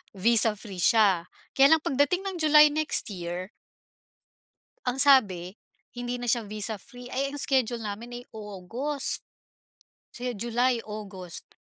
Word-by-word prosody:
visa-free 210 -2 +1
siya. 195 -5 +4 0.3
Kaya 275 +3 +7
lang 315 - -14
pagdating 285 +8 +1
ng 380 -2 -4
July 300 -1 +7
next 310 -6 -1
year 180 0 -5 1.4
ang 250 +1 -1
sabi, 205 -10 +4 0.4
hindi 245 0 -4
na 245 - -5
siya 235 0 +2
visa-free. 215 +3 -5
Eh, 275 +2 -2
ang 290 - -3
schedule 255 -4 +1
namin 230 +3 -6
ay - - -12
August, 220 +8 -3 0.9
kasi 245 0 -5
July, 240 +2 0
August. 195 -5 -8
235 Hz, 125 wpm, -27 LUFS, 205-265 Hz, 1.4 s, Kaya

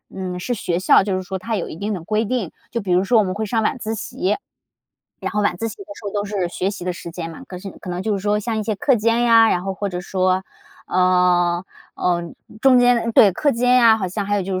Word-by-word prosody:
嗯， 180 -1 -4
是 245 +7 -2
学 175 -5 -2
校， 185 - +5
就 195 -2 -1
是 185 - -3
说 190 0 -5
它 225 +4 -3
有 185 - -3
一 - - -8
定 205 +2 -3
的 170 - -7
规 215 +5 0
定， 220 -6 -2 0.2
就 235 - -2
比 195 -3 -4
如 180 +2 +3
说 230 +4 +3
我 215 - +5
们 185 -1 -2
会 215 +2 -3
上 225 +1 0
晚 250 - -1
自 220 +1 -3
习。 200 -2 -2 0.8
然 - - -4
后 210 0 0
晚 180 - +1
自 225 - -3
习 - - -7
的 400 - -9
时 215 - -13
候 200 - -4
都 205 -1 -1
是 200 -3 -2
学 185 +2 -2
习 200 -4 -7
的 180 - -1
时 170 0 -8
间 165 -1 -6
嘛， 160 - -11
可 180 - -7
是 195 +1 -8
可 180 - -9
能 175 +1 -3
就 215 - 0
是 195 - -5
说 210 +1 +1
像 220 +1 -3
一 215 - -1
些 215 0 -1
课 270 - +3
间 230 +1 +1
呀， 230 -1 +6
然 180 - 0
后 195 -1 -3
或 200 +1 -3
者 180 -1 -4
说， 185 0 0 0.4
呃， 180 -1 +2 0.3
嗯， 175 -1 -1 0.3
中 265 -2 +6
间 245 -1 +3
对， 205 -4 +6
课 290 - +1
间 250 0 +2
呀， 230 -3 +6
好 190 - -2
像 200 +3 -3
还 205 +1 0
有 195 - 0
就 190 +1 -3
200 Hz, 295 characters per minute, -21 LUFS, 180-225 Hz, 0.8 s, 呀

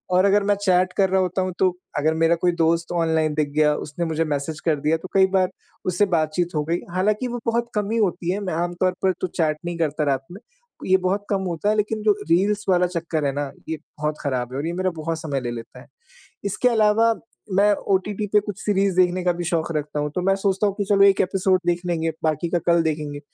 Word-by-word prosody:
और 185 +2 +5
अगर 200 +1 +4
मैं 205 0 +2
चैट 185 -2 +2
कर 195 -1 +3
रहा 190 0 +2
होता 185 +1 -1
हूँ, 185 0 -1
तो 190 - +4 0.3
अगर 155 +2 +2
मेरा 165 +1 +3
कोई 175 +1 +1
दोस्त 165 +1 +1
ऑनलाइन 160 -2 +1
दिख 150 -1 0
गया 150 -1 +4
उसने 150 +4 -4
मुझे 160 0 0
मैसेज 150 +1 -3
कर 160 -2 +1
दिया, 155 +3 +2
तो 175 - -9
कई 195 -1 +6
बार 185 -1 +3 0.4
उससे 185 +3 +2
बातचीत 165 +2 0
हो 150 - +1
गई। 170 +2 0
हालाँकि 210 +7 0
वो 245 0 -4
बहुत 235 0 0
कम 210 0 -1
ही 230 - 0
होती 180 -5 0
है, 195 - -1
मैं 195 -4 -3
आम 175 +2 -1
तौर 185 -1 +3
पर 190 - +4
तो - - 0
चैट 155 -3 0
नहीं 175 -1 -3
करता 155 -2 0
रात 135 0 -2
में, 190 - -9 0.5
ये 190 0 +4
बहुत 190 +2 -1
कम 195 -2 +1
होता 170 +4 -1
है, 215 - +2
लेकिन 215 +1 -1
जो 215 - +5 0.2
रील्स 200 +5 +2
वाला 180 -1 +4
चक्कर 165 -3 -2
है 140 - +1
ना, 145 0 -3 0.2
ये 160 - -2 0.2
बहुत 150 0 -1
ख़राब 125 -3 -2
है - - -3
और 150 - -3
ये 170 - -2
मेरा 185 +1 0
बहुत 160 +1 -3
समय 145 -3 -2
ले 120 -1 -3
लेता 120 +1 -9
है। 140 - -17 0.6
इसके 205 +5 +1
अलावा 225 0 +3 0.4
मैं 205 +1 +5 0.2
ओटीटी 205 +2 -1
पे 210 - +6
कुछ 205 -1 -7
सीरीज़ 195 -2 +1
देखने 185 0 +3
का 180 - +3
भी 175 0 -5
शौक 170 -1 -1
रखता 150 0 -3
हूँ, 150 0 -2
तो - - 0
मैं 195 +1 +3
सोचता 195 +1 +1
हूँ 200 - 0
कि 205 - 0
चलो 195 0 +3
1 195 -1 +5
एपिसोड 185 0 +2
देख 175 0 +1
लेंगे 165 -2 0
बाकी 155 +2 0
का 175 - +2
कल 170 -1 +4
देखेंगे। 150 -2 -3
175 Hz, 245 wpm, -23 LUFS, 160-195 Hz, 0.6 s, कई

